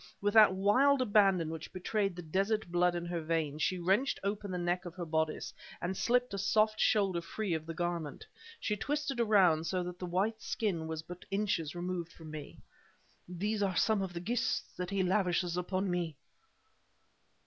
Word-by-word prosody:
With 205 0 0
that 215 -4 +7
wild 255 +9 +4
abandon 195 -8 +3
which 160 0 -7
betrayed 195 +1 -1
the 175 - -7
desert 195 +4 0
blood 175 0 +3
in 175 0 -3
her 170 -1 -3
veins, 155 -2 -1
she 185 - +1
wrenched 195 +10 +1
open 200 0 -2
the 180 - -2
neck 175 +1 -1
of 175 -2 -8
her 175 -2 -4
bodice 160 -1 -1 0.3
and 180 +2 -2
slipped 245 +2 +1
a 200 - -2
soft 215 +2 +2
shoulder 195 -5 +2
free 195 +2 -3
of 160 0 -3
the 165 - -5
garment. 170 -3 -3 0.3
She 210 - -1
twisted 290 +3 -2
around, 190 -8 +4
so 185 -1 0
that 180 0 -7
the 180 - -4
white 200 +5 0
skin 175 -8 -2
was 160 -1 -4
but 180 +2 -9
inches 190 -6 -1
removed 175 -1 -3
from 160 -2 -11
me. 150 -2 -8 0.7
"These 205 +4 -2
are 190 -3 0
some 215 -3 +3
of 190 -2 -4
the 170 - -4
gifts 235 +6 0
that 180 -1 -4
he 195 -1 +1
lavishes 180 -2 +1
upon 185 +1 -1
me!" 170 -3 -2
185 Hz, 185 wpm, -32 LUFS, 170-205 Hz, 0.7 s, that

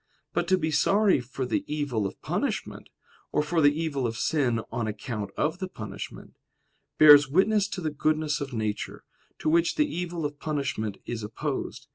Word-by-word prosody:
But 175 0 0
to 190 +1 +4
be 160 -3 -1
sorry 195 +5 +3
for 130 +1 -5
the - - -1
evil 135 -9 -1
of 95 - -10
punishment, - - -3 0.4
or 150 - +2
for 165 +2 +1
the 145 -1 +6
evil 140 -6 -1
of 115 0 -4
sin 125 -7 +1
on 115 -1 -2
account 105 -1 -4
of 160 +4 0
the 185 - -3
punishment, 110 - -8 0.6
bears 145 -1 +9
witness 200 +6 +3
to 190 - -5
the 155 -2 -1
goodness 155 0 0
of 140 -1 -4
nature, 110 -3 -3 0.3
to - - -4
which 165 +2 +3
the 300 - +3
evil 175 - -3
of 145 0 -4
punishment 140 -9 -2
is 120 -2 -4
opposed. 105 +1 -4
145 Hz, 175 wpm, -27 LUFS, 120-165 Hz, 0.6 s, bears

